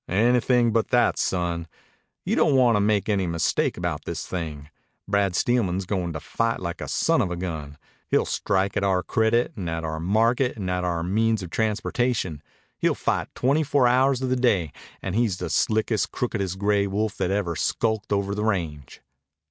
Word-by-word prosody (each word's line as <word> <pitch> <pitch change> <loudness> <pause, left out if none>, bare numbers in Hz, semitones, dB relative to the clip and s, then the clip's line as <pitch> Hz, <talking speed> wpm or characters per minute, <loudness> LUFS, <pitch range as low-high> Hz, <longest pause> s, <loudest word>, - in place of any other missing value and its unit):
"Anything 120 +4 +3
but 115 -1 +1
that, 125 -1 +2
son. 85 -2 -1 0.6
You - - +1
don't 145 - +3
want 125 -3 +5
to - - +3
make 105 0 +1
any 100 -4 +1
mistake 85 -2 0
about - - -3
this - - -4
thing. 80 -4 -5 0.4
Brad 100 -2 +1
Steelman's 95 -5 +1
goin' 90 -2 -2
to 80 - -4
fight 115 +8 -1
like 85 -1 -5
a - - -4
son - - +2
of 90 - 0
a 90 - -3
gun. 80 -5 -5 0.3
He'll - - +2
strike 95 +1 0
at - - 0
our 95 -2 +1
credit 115 +5 +1
and 90 -5 -4
at 80 0 -3
our 80 0 -3
market 115 - +1
and 95 -3 -3
at 90 0 -1
our 85 -2 -1
means 110 +3 +1
of 85 - -8
transportation. 110 - -1 0.4
He'll - - +2
fight - - -1
twenty 140 +5 +2
four 140 -4 +3
hours 130 +1 +3
of 130 - 0
the 130 - +2
day, 100 - +1 0.3
and 95 - -3
he's 110 -4 +1
the 90 -3 -4
slickest, 110 0 +1
crookedest 100 -6 -2
gray 100 0 +1
wolf 105 +2 -1
that 90 - 0
ever 95 -4 -1
skulked 110 +2 -1
over 100 0 0
the 105 +1 -2
range." 80 -10 -3
100 Hz, 190 wpm, -24 LUFS, 90-115 Hz, 0.6 s, want